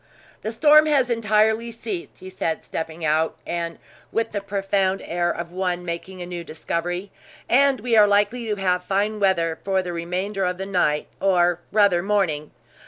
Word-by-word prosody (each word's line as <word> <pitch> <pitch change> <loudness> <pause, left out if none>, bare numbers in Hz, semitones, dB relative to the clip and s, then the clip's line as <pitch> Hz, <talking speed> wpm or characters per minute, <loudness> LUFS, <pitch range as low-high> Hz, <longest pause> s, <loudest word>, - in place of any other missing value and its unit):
"The 220 - -3
storm 300 +6 +6
has 270 -5 +2
entirely 220 0 +2
ceased," 350 - -6
he 185 - -10
said, 165 -3 -2
stepping 160 0 -5
out, 155 +1 +1
and 170 -1 -3 0.3
with 225 0 -1
the 205 - -3
profound 195 -1 0
air 175 +1 -1
of 170 0 -4
one 180 -1 -2
making 180 +2 -5
a - - -6
new 175 -1 -6
discovery, 175 +4 -4 0.4
"and 275 +1 +4
we 240 -2 0
are 210 -1 +7
likely 205 +4 +1
to 210 - 0
have 180 -2 0
fine 205 +3 0
weather 170 -5 +1
for 190 -1 +1
the 175 -1 -5
remainder 185 +4 -2
of 180 0 -1
the 190 - -4
night 175 -6 +1
or 175 -3 +3
rather, 200 -4 +4
morning. 180 -7 0
190 Hz, 170 wpm, -23 LUFS, 175-210 Hz, 0.4 s, are